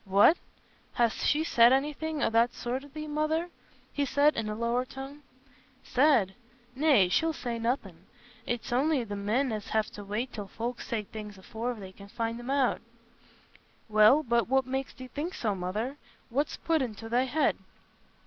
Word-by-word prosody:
"What! 200 - +6 0.6
Has 235 -2 +3
she 300 +2 +2
said 235 -6 +6
anything 295 +3 0
o' - - +2
that 230 +2 +3
sort 250 +2 -3
to 285 - -12
thee, 305 +2 -7
Mother?" 310 +3 -1 0.4
he 285 - 0
said, 285 +2 +3
in 220 -2 -2
a 210 - -3
lower 235 +2 0
tone. 270 +3 -9 0.6
"Said? 255 -8 +3 0.4
Nay, 270 - +5
she'll 320 - +1
say 240 -5 -4
nothin'. 200 -7 -3 0.4
It's 240 0 -2
on'y 275 +1 +2
the 205 -2 -5
men 225 +6 0
as 215 -2 -4
have 220 -1 0
to 205 - -9
wait 215 +6 -3
till 205 -3 -6
folks 235 +4 -5
say 220 -2 -2
things 210 0 -9
afore 225 +6 -4
they 195 -4 -9
find 225 +4 -5
'em 240 +2 -8
out." 275 -2 +2 1.1
"Well, 215 +8 +6
but 235 -2 +1
what 265 -1 +3
makes 265 +1 -3
thee 255 - -9
think 305 +7 -4
so, 215 -3 -1
Mother? 210 +9 -3 0.3
What's 285 +5 -1
put 325 -2 +1
it - - +2
into 225 -1 -8
thy 245 +3 +2
head?" 295 +4 +2
245 Hz, 175 wpm, -29 LUFS, 215-280 Hz, 1.1 s, What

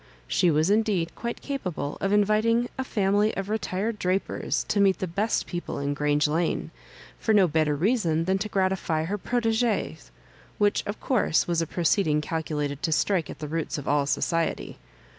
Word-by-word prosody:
She 170 - +2
was 155 +4 +2
indeed 205 -6 +1
quite 235 +1 -5
capable 180 - -4
of 195 - 0
inviting 215 +3 +3
a 265 - -2
fiunily 205 -2 +1
of 195 +1 -3
retired 210 0 -2
drapers 185 +2 -1
to 205 - 0
meet 195 -1 +4
the - - -2
best 200 +6 -1
people 175 -1 -5
in 140 0 -1
Grange 150 +1 +1
Lane, 165 +3 -1 0.5
for 220 - +2
no 195 -3 +6
better 155 -1 +1
reason 165 - +1
tban 190 +1 +1
to 215 +1 -3
gratify 185 -5 0
her 200 +6 -3
proteges^ 230 0 -1 0.5
which, 205 -1 +2
of 205 - -4
course, 235 - +1
was 170 -1 +1
a 165 - -2
proceeding 165 -2 +1
calculated 150 -2 -3
to 160 - -1
strike 175 0 +1
at - - -7
the 150 - -6
roots 160 +1 -3
of 145 - -7
all 145 -1 +2
society. 165 - -1
185 Hz, 175 wpm, -26 LUFS, 160-210 Hz, 0.5 s, no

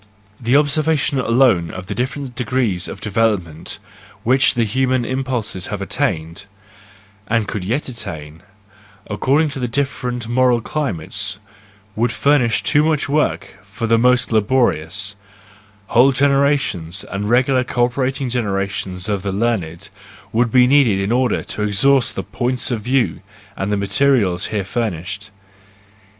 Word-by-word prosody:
The 120 +1 +1
observation 150 -1 +1
alone 115 -9 +3
of 95 0 -7
the - - -4
different 130 +1 -3
degrees 120 -7 -1
of - - -8
development 100 -7 -1 0.5
which 130 +3 +3
the 120 - +2
human 130 +3 0
impulses 125 -7 -2
have - - -4
attained, 80 +5 -2 0.8
and 115 -1 0
could 105 -4 -4
yet 120 +10 -2
attain, 80 - -7 0.7
according 140 +9 +2
to 135 - -6
the 125 - -1
different 125 -2 -2
moral 125 0 +3
climates, 105 - -2 0.6
would 120 +3 +1
furnish 140 -6 +2
too 150 -1 +3
much 155 -2 +1
work 140 -10 -1
for 105 +3 -6
the 115 0 +3
most 125 0 +3
laborious; 105 -4 +1 0.7
whole 120 +6 +4
generations, 135 - +1
and 100 +2 -4
regular 125 +2 +3
co 120 -1 +1
operating 130 +2 -2
generations 100 -5 -2
of 100 -2 -1
the 100 0 -3
learned, 95 -6 -1 0.5
would 115 0 +2
be 125 0 +6
needed 125 -7 +4
in 100 +2 -1
order 125 -2 +1
to - - -4
exhaust 120 +6 +2
the 95 - -3
points 125 +5 -2
of 115 -3 -2
view 120 -6 0 0.3
and 95 +1 -3
the 105 - +1
material 110 -2 +2
here 100 +1 -2
furnished. 100 -1 -4
115 Hz, 135 wpm, -19 LUFS, 100-130 Hz, 0.8 s, be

